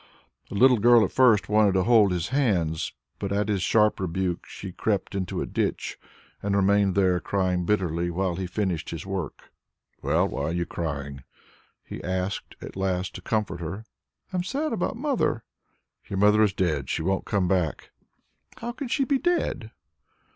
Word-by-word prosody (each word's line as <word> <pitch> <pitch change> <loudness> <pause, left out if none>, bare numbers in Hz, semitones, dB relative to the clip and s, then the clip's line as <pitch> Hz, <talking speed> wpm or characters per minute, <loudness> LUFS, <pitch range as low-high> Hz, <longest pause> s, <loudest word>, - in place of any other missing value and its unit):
The - - -6
little 125 +2 +5
girl 120 0 +6
at - - -5
first 115 -7 +4
wanted 105 -2 +3
to 95 - +3
hold 110 -3 +5
his 90 -2 -1
hands, 95 - 0 0.3
but 100 - -3
at 105 +1 0
his 100 -3 0
sharp 105 +2 +3
rebuke 90 -1 -2
she 95 - -8
crept 100 +1 -1
into 95 -3 -2
a - - -4
ditch - - -2 0.4
and 100 0 0
remained 100 -1 +3
there 95 -2 +3
crying 90 -2 -1
bitterly, 85 -4 0
while 90 0 -1
he 95 +1 -3
finished 90 -4 -2
his 85 0 -6
work. 95 -5 -5 0.5
"Well, - - +2
why - - -4
are 80 - -1
you 85 0 -1
crying?" 70 -6 -5 0.6
he - - -8
asked 95 +2 -3
at - - -8
last 95 -1 -1
to - - -8
comfort 105 -6 -1
her. 90 +7 -6 0.5
"I - - 0
am 175 - 0
sad 285 +9 -2
about 230 - -1
mother." 260 - 0 0.7
"Your 100 - -3
mother 105 +2 +5
is 105 -3 +3
dead; 75 -9 -1
she - - -1
won't 95 +3 0
come 100 -4 +1
back." 90 -4 -1 0.7
"How 235 +1 -4
can 265 +2 -6
she 245 +3 +1
be 275 0 +1
dead?" 350 +2 0
95 Hz, 175 wpm, -26 LUFS, 90-110 Hz, 0.7 s, girl